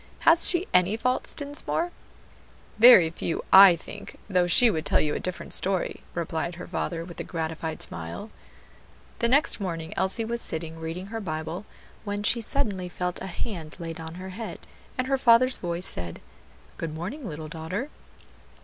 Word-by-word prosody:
Has 330 Hz, +1 st, +7 dB
she 355 Hz, +1 st, +4 dB
any 180 Hz, +4 st, +3 dB
faults, 250 Hz, +2 st, -1 dB
Dinsmore?" 290 Hz, +4 st, -3 dB, 0.9 s
"Very 215 Hz, -9 st, +8 dB
few, 165 Hz, 0 st, -4 dB
I 190 Hz, -2 st, +10 dB
think; 200 Hz, +5 st, -10 dB
though 180 Hz, -3 st, +2 dB
she 230 Hz, +7 st, +6 dB
would 160 Hz, -4 st, -2 dB
tell -, -, +3 dB
you 150 Hz, -, 0 dB
a -, -, -2 dB
different 185 Hz, -1 st, -5 dB
story," 190 Hz, -1 st, 0 dB
replied 170 Hz, 0 st, -3 dB
her 180 Hz, -, -9 dB
father 165 Hz, -1 st, -3 dB
with 170 Hz, -1 st, -10 dB
a -, -, -3 dB
gratified 160 Hz, -1 st, -4 dB
smile. 85 Hz, -, -7 dB, 0.9 s
The 235 Hz, -, +2 dB
next 280 Hz, +3 st, +3 dB
morning 165 Hz, -5 st, -4 dB
Elsie 190 Hz, +4 st, -1 dB
was 235 Hz, +1 st, -2 dB
sitting 160 Hz, 0 st, -4 dB
reading 165 Hz, +3 st, -5 dB
her 225 Hz, -, -3 dB
Bible, 160 Hz, +2 st, -5 dB, 0.4 s
when 205 Hz, 0 st, -4 dB
she 235 Hz, +2 st, +2 dB
suddenly 210 Hz, -7 st, 0 dB
felt 180 Hz, 0 st, -4 dB
a -, -, -5 dB
hand 170 Hz, -4 st, -6 dB
laid 165 Hz, -2 st, -6 dB
on 160 Hz, 0 st, -8 dB
her 185 Hz, +1 st, -8 dB
head, 220 Hz, +4 st, -7 dB, 0.4 s
and 255 Hz, -, 0 dB
her 270 Hz, 0 st, 0 dB
father's 255 Hz, +2 st, +5 dB
voice 175 Hz, 0 st, -3 dB
said, 85 Hz, -1 st, -1 dB, 0.6 s
"Good 160 Hz, -2 st, -5 dB
morning, 210 Hz, -, -6 dB
little 155 Hz, 0 st, -7 dB
daughter." 175 Hz, -, -5 dB
180 Hz, 165 wpm, -26 LUFS, 165-230 Hz, 0.9 s, I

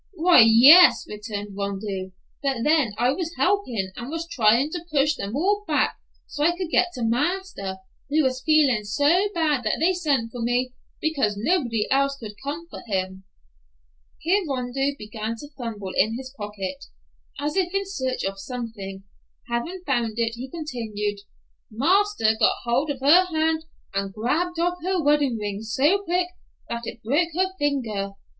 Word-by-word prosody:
"Why, 340 Hz, -6 st, +7 dB
yes," 265 Hz, +11 st, +8 dB
returned 205 Hz, -1 st, -6 dB
Rondeau; 195 Hz, -1 st, -4 dB, 0.3 s
"but 270 Hz, -5 st, -1 dB
then 295 Hz, -8 st, +2 dB
I 245 Hz, +3 st, +2 dB
was 335 Hz, +3 st, -4 dB
helpin' 255 Hz, -, 0 dB
and 240 Hz, +1 st, -7 dB
was 330 Hz, +2 st, -4 dB
tryin' 245 Hz, -1 st, +3 dB
to 345 Hz, -1 st, -5 dB
push 295 Hz, 0 st, +3 dB
them 210 Hz, -4 st, -5 dB
all 405 Hz, +7 st, +1 dB
back -, -, +1 dB, 0.3 s
so 290 Hz, -, -4 dB
I 345 Hz, +3 st, +2 dB
could 360 Hz, -3 st, -4 dB
get 365 Hz, -, +4 dB
to 245 Hz, -, -4 dB
marster, 245 Hz, -, -1 dB, 0.3 s
who 305 Hz, +2 st, +3 dB
was 260 Hz, -1 st, 0 dB
feelin' 285 Hz, -7 st, +3 dB
so 295 Hz, -, +2 dB
bad 305 Hz, -5 st, +1 dB
that 215 Hz, -, 0 dB
they 345 Hz, +4 st, +3 dB
sent 285 Hz, -10 st, 0 dB
for 245 Hz, -, -6 dB
me, 245 Hz, +2 st, 0 dB, 0.3 s
because 275 Hz, -10 st, 0 dB
nobody 240 Hz, -, 0 dB
else 275 Hz, +1 st, +2 dB
could 215 Hz, -4 st, -8 dB
comfort 310 Hz, +5 st, -6 dB
him." 190 Hz, -2 st, -3 dB, 0.9 s
Here 380 Hz, +5 st, +1 dB
Rondeau 270 Hz, +2 st, -1 dB
began 215 Hz, +1 st, -5 dB
to 290 Hz, +5 st, -10 dB
fumble 220 Hz, -7 st, -5 dB
in 220 Hz, +4 st, +2 dB
his 260 Hz, 0 st, -9 dB
pocket, 205 Hz, -4 st, -6 dB, 0.5 s
as 295 Hz, +1 st, -2 dB
if 365 Hz, -2 st, +1 dB
in 395 Hz, +1 st, -1 dB
search 260 Hz, -10 st, -3 dB
of 195 Hz, 0 st, -3 dB
something. 205 Hz, -5 st, -7 dB, 0.5 s
Having 335 Hz, +11 st, -3 dB
found 240 Hz, -5 st, 0 dB
it, 230 Hz, -1 st, 0 dB
he 250 Hz, +3 st, -7 dB
continued, 225 Hz, -10 st, -4 dB, 0.5 s
"Marster 330 Hz, -, +2 dB
got -, -, +4 dB
hold 250 Hz, +6 st, 0 dB
of 275 Hz, -2 st, -4 dB
her 330 Hz, +7 st, +6 dB
hand 320 Hz, -2 st, 0 dB, 0.3 s
and 195 Hz, 0 st, -2 dB
grabbed 315 Hz, -, -1 dB
off 355 Hz, +1 st, 0 dB
her 370 Hz, +2 st, 0 dB
wedding 290 Hz, -5 st, +2 dB
ring 205 Hz, -1 st, -4 dB
so 275 Hz, -, +2 dB
quick 355 Hz, -1 st, 0 dB, 0.4 s
that 235 Hz, 0 st, -4 dB
it 230 Hz, -, -8 dB
broke 295 Hz, +9 st, +1 dB
her 375 Hz, +1 st, +1 dB
finger. 225 Hz, -9 st, -1 dB
260 Hz, 165 wpm, -24 LUFS, 220-325 Hz, 0.9 s, yes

